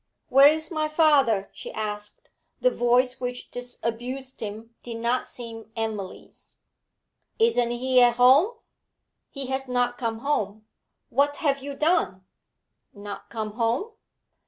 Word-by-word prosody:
'Where 275 Hz, +1 st, +8 dB
is 315 Hz, +3 st, +1 dB
my 310 Hz, -2 st, 0 dB
father?' 285 Hz, -10 st, +3 dB
she -, -, -8 dB
asked; 210 Hz, -1 st, -4 dB, 0.3 s
the -, -, +3 dB
voice 250 Hz, -, +2 dB
which 250 Hz, 0 st, -5 dB
disabused 245 Hz, +2 st, -5 dB
him 220 Hz, +2 st, -7 dB
did 235 Hz, -1 st, -6 dB
not 235 Hz, +2 st, 0 dB
seem 225 Hz, -2 st, -9 dB
Emily's. 215 Hz, -4 st, -6 dB, 0.8 s
'Isn't 445 Hz, -, +3 dB
he 250 Hz, +1 st, +3 dB
at 240 Hz, -1 st, +5 dB
home?' 270 Hz, -, +5 dB, 0.7 s
'He 275 Hz, -1 st, -6 dB
has 265 Hz, 0 st, -3 dB
not 245 Hz, -1 st, 0 dB
come 225 Hz, -2 st, -2 dB
home. 215 Hz, -7 st, -1 dB, 0.5 s
What 285 Hz, +3 st, +2 dB
have 285 Hz, -5 st, +1 dB
you 280 Hz, +1 st, -6 dB
done?' 190 Hz, -, +1 dB, 0.7 s
'Not 205 Hz, 0 st, -8 dB
come 220 Hz, -2 st, -4 dB
home?' 235 Hz, -, -1 dB
245 Hz, 130 wpm, -25 LUFS, 225-275 Hz, 0.8 s, Where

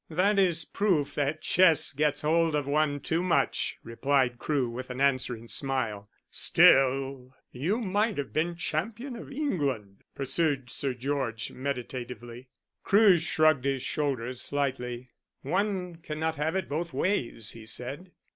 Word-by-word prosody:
"That 195 Hz, +5 st, +2 dB
is 170 Hz, -4 st, +2 dB
proof 180 Hz, -9 st, 0 dB
that 145 Hz, +2 st, -1 dB
chess 165 Hz, -6 st, +4 dB
gets 150 Hz, +1 st, 0 dB
hold 165 Hz, +1 st, +2 dB
of 145 Hz, -2 st, 0 dB
one 145 Hz, 0 st, +1 dB
too 160 Hz, +4 st, 0 dB
much," 180 Hz, -2 st, 0 dB
replied 125 Hz, +1 st, 0 dB
Crewe, 140 Hz, -5 st, 0 dB
with 125 Hz, +2 st, -6 dB
an 125 Hz, +1 st, -6 dB
answering 130 Hz, -4 st, 0 dB
smile. 115 Hz, -7 st, -2 dB, 0.2 s
"Still, 135 Hz, -1 st, +3 dB, 0.2 s
you 165 Hz, -, -1 dB
might 210 Hz, 0 st, 0 dB
have 140 Hz, -2 st, -4 dB
been 170 Hz, +3 st, 0 dB
champion 225 Hz, -, -3 dB
of 235 Hz, -, -9 dB
England," 140 Hz, -, -2 dB
pursued 140 Hz, -2 st, -1 dB
Sir 135 Hz, -3 st, -2 dB
George 125 Hz, -4 st, -2 dB
meditatively. 125 Hz, -2 st, -6 dB, 0.3 s
Crewe 200 Hz, -3 st, +5 dB
shrugged 155 Hz, -4 st, +2 dB
his 135 Hz, -2 st, 0 dB
shoulders 130 Hz, -5 st, -2 dB
slightly. 130 Hz, -3 st, -3 dB, 0.3 s
"One 180 Hz, +2 st, -1 dB
cannot 160 Hz, 0 st, -3 dB
have 155 Hz, +4 st, -1 dB
it 190 Hz, -2 st, -1 dB
both 165 Hz, +4 st, -3 dB
ways," 120 Hz, -, 0 dB
he 110 Hz, -1 st, -11 dB
said. 140 Hz, +11 st, -4 dB
145 Hz, 135 wpm, -28 LUFS, 130-170 Hz, 0.3 s, Crewe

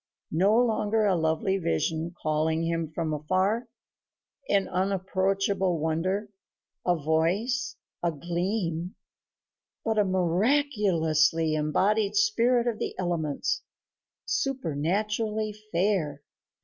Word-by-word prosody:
No 195 Hz, +7 st, +4 dB
longer 220 Hz, -2 st, +2 dB
a 195 Hz, -2 st, +3 dB
lovely 160 Hz, +4 st, +1 dB
vision 160 Hz, -, -1 dB
calling 155 Hz, +1 st, 0 dB
him 165 Hz, -1 st, -1 dB
from 160 Hz, -1 st, -2 dB
afar 190 Hz, +10 st, 0 dB, 0.8 s
an 200 Hz, -1 st, +2 dB
unapproachable 190 Hz, 0 st, 0 dB
wonder, 170 Hz, +7 st, -1 dB, 0.5 s
a 180 Hz, -, +2 dB
voice, 170 Hz, -, 0 dB, 0.3 s
a 170 Hz, -, +1 dB
gleam 175 Hz, +2 st, -2 dB, 0.9 s
but 220 Hz, -2 st, +1 dB
a -, -, +5 dB
miraculously 180 Hz, -, +2 dB
embodied 195 Hz, +8 st, +1 dB
spirit 250 Hz, -, +3 dB
of 235 Hz, -3 st, -1 dB
the -, -, -4 dB
elements, 175 Hz, -, -1 dB, 0.6 s
supernaturally 215 Hz, -, -1 dB, 0.2 s
fair. 170 Hz, -6 st, 0 dB
185 Hz, 95 wpm, -27 LUFS, 160-215 Hz, 0.9 s, a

